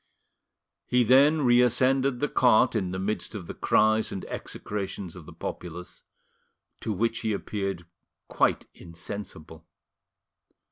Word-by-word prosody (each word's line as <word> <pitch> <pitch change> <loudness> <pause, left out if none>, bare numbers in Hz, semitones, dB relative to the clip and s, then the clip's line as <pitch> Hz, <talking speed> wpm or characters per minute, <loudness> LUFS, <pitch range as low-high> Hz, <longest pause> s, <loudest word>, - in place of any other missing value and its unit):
He 125 0 +3
then 140 +6 +5
reascended 125 +2 +3
the 145 - +1
cart 125 -3 +4
in 95 -4 0
the 95 - -4
midst 105 +4 -3
of 95 -5 -6
the - - -7
cries 110 0 +2
and 95 - -5
execrations 100 -3 -6
of 85 -4 -12
the - - -10
populace, 90 0 -8 0.8
to 110 - -3
which 115 +3 0
he 110 -2 -1
appeared 100 -3 -4 0.4
quite - - +1
insensible. 85 -2 -9
105 Hz, 125 wpm, -27 LUFS, 95-125 Hz, 0.8 s, then